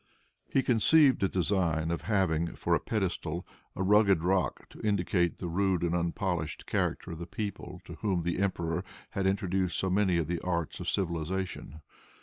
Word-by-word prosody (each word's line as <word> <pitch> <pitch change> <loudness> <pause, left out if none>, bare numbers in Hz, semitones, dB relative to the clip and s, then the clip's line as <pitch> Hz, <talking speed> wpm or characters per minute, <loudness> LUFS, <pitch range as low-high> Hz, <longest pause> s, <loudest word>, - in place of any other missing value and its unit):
He 135 - +2
conceived 130 +4 +4
the 95 - +2
design 85 -3 +1
of 85 - -2
having, 85 -6 0
for - - 0
a - - +4
pedestal, 90 -5 -2 0.3
a 95 - -1
rugged 100 -3 +4
rock, 90 0 0
to - - -12
indicate 90 -4 +1
the 90 - -5
rude 95 0 +1
and 85 -1 +1
unpolished 85 -2 -2
character - - -1
of 80 - -7
the 85 - -6
people 95 -4 -5
to - - -8
whom 95 -5 0
the 85 +1 -1
emperor 90 -3 -1 0.3
had 95 -1 0
introduced 95 -2 0
so 95 - 0
many 95 -2 +3
of 85 - +1
the 85 +2 -2
arts 85 -3 -2
of - - -2
civilization. 85 -2 -3
90 Hz, 170 wpm, -30 LUFS, 85-100 Hz, 0.3 s, conceived